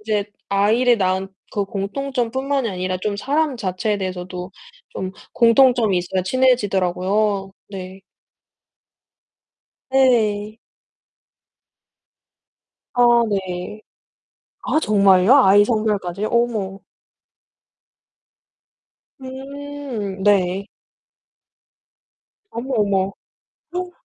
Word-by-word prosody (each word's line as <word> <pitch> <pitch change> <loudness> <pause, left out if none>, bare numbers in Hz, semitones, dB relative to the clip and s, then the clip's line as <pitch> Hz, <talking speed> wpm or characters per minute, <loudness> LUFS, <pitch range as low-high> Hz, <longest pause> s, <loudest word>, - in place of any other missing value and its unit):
이제 210 -1 -1 0.2
아이를 220 +5 +3
낳은 190 0 0 0.2
그 205 -1 -1
공통점뿐만이 260 +5 -2
아니라 185 -1 -3
좀 205 +1 -2
사람 290 +4 0
자체에 205 +1 -2
대해서도 185 -1 -5 0.4
좀 185 0 -5 0.2
공통점이 235 -3 +4
있어야 185 +1 -2
친해지더라고요. 195 -3 +1 0.2
네. 190 0 -8 1.9
네. 220 -5 +2 2.4
아, 245 - +3 0.3
네. 190 +1 -4 0.8
아, - - +1
정말요? 200 -3 +4
아이 205 +2 +6
성별까지요? 210 -3 -1
어머. 220 -5 0 2.4
음. 265 -6 -6
네. 195 -1 +2 1.9
어머, 255 +3 -4
어머. 200 -3 +2 0.7
어? 360 0 -3
205 Hz, 165 characters per minute, -20 LUFS, 190-245 Hz, 2.4 s, 아이